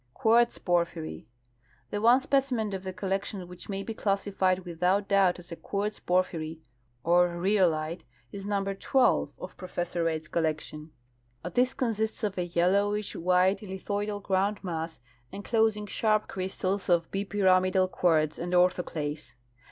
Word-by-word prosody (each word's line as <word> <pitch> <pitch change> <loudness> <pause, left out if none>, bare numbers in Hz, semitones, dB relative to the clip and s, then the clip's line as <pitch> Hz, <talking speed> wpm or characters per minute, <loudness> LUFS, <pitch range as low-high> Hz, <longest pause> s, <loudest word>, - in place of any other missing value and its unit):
Quartz 235 +2 +3
pwphyry. 170 - -1 0.3
— 120 +1 -36
Tlie 205 - -1
one 240 +3 +6
specimen 260 -6 0
of 190 - -3
tlie 185 -1 -6
collection 195 -1 -3
which 180 +3 -11
may 195 0 -3
be 225 - -5
classified 195 -3 0
without 180 +4 0
doubt 195 -2 +3
as 175 0 -14
a - - -4
quartz 205 +4 -3
por2:)hyry 170 -3 -1 0.5
or 175 +1 +4
rhyo 185 +2 +2
lite 155 +2 -4 0.3
is 195 - -7
number 195 -1 -1
12 250 +6 +2
of - - -9
Professor 175 -2 -3
Reid's 160 -1 -1
collection. 155 -1 -2 0.6
This 255 +1 +2
consists 225 -3 -1
of 205 -2 -1
a 175 0 -2
3^ellowish 200 +4 +1
white 180 +3 +3
lithoidal 205 +1 -4
grounclmass, 185 -5 -1 0.3
enclosing 215 +1 0
sharj) 215 +1 +1
crystals 190 +1 -2
oi 175 -1 +5
bipyramidal 185 -2 +2
quartz 155 -3 +2
and 175 +1 -3
orthoclase. 170 -6 0
190 Hz, 135 wpm, -28 LUFS, 175-205 Hz, 0.6 s, one